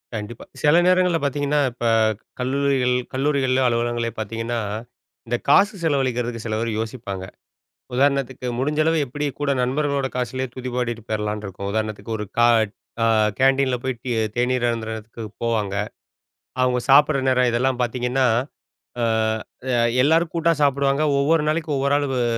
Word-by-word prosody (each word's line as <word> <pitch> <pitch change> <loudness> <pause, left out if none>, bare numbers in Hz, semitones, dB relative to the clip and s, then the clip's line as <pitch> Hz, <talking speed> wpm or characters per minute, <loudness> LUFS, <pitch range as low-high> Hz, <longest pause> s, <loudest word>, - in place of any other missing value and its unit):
கண்டிப்பா. 110 +2 -6 0.2
சில 150 +2 +5
நேரங்கள்ல 180 -2 +3
பாத்தீங்கன்னா 145 +1 0
இப்ப 120 0 -6 0.5
கல்லூரிகள் 130 -1 +1 0.2
கல்லூரிகளிலோ, 130 -1 +1
அலுவலகங்களிலோ 120 -1 -1
பாத்தீங்கன்னா, 115 +2 -3 0.7
இந்தக் 120 +1 -3
காசு 200 +9 +5
செலவழிக்கறதுக்கு 125 -6 -1
சில 110 -1 -2
பேரு 115 0 -1
யோசிப்பாங்க. 110 -5 -5 0.7
உதாரணத்துக்கு 135 -2 +1
முடிஞ்ச 150 +3 -1
அளவு 160 +1 +2
எப்டி 145 +3 -4
கூட 145 -1 0
நண்பர்களோட 140 +1 0
காசுல 130 +1 -2
துதி 130 0 -5
பாடிட்டு 120 -2 -2
போயிரலாம்னு 105 -1 -2
இருக்கும். 100 +1 -6
உதாரணத்துக்கு 110 +1 -3
ஒரு 105 - -3
க - - +5 0.6
அ - - +4 0.3
கேண்டீன்ல 135 -1 +3
போயிட்டு 130 -3 -3
டீ 125 - -2 0.2
தேநீர் 125 0 +1
அருந்தறதுக்கு 110 0 -5 0.2
போவாங்க. 110 -4 -1 0.9
அவங்க 125 -1 +2
சாப்டுற 145 +2 +6
நேரம் 125 -1 +3
இதெல்லாம் 125 +2 0
பாத்தீங்கன்னா? 125 +2 0 0.8
அ - - +2 0.7
அ - - +2 0.3
எல்லாரும் 160 +3 +2
கூட்டா 170 0 +2
சாப்டுவாங்க. 140 0 +2 0.2
ஒவ்வொரு 150 +3 +3
நாளைக்கு 155 0 -1
ஒவ்வொரு 140 +1 +1
ஆளு 145 0 0
அ - - +2
130 Hz, 135 wpm, -22 LUFS, 115-140 Hz, 0.9 s, சாப்டுற